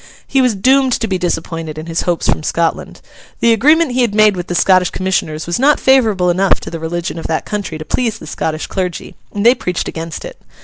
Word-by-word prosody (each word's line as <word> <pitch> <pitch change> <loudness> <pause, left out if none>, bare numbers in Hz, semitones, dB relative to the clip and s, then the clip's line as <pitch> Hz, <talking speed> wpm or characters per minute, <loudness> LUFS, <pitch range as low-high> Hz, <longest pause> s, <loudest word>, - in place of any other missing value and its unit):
He 270 - +1
was 250 -4 +2
doomed 260 +5 +3
to 225 - -1
be 190 -3 -1
disappointed 165 -2 -3
in 155 - -6
his 165 0 -2
hopes 175 -2 -1
from - - +1
Scotland. 165 +1 -2 0.4
The 235 0 +4
agreement 300 +6 +3
he 250 +1 +1
had 230 -4 0
made 215 -2 +5
with 175 -1 -5
the 175 - -3
Scottish 185 0 +4
Commissioners 160 -4 -2
was 170 +4 -2
not 285 +3 +4
favourable 220 -9 +3
enough 190 +2 +2
to - - -8
the 165 - -5
religion 170 +1 -4
of - - -5
that 160 - -2
country 205 -6 -4
to 155 - -8
please 235 +2 -1
the - - -11
Scottish 155 0 -3
clergy; 180 -3 -4 0.2
and 205 +1 -3
they 240 - +8
preached 180 -8 -3
against 165 -1 -6
it. - - -10
185 Hz, 225 wpm, -16 LUFS, 165-235 Hz, 0.4 s, they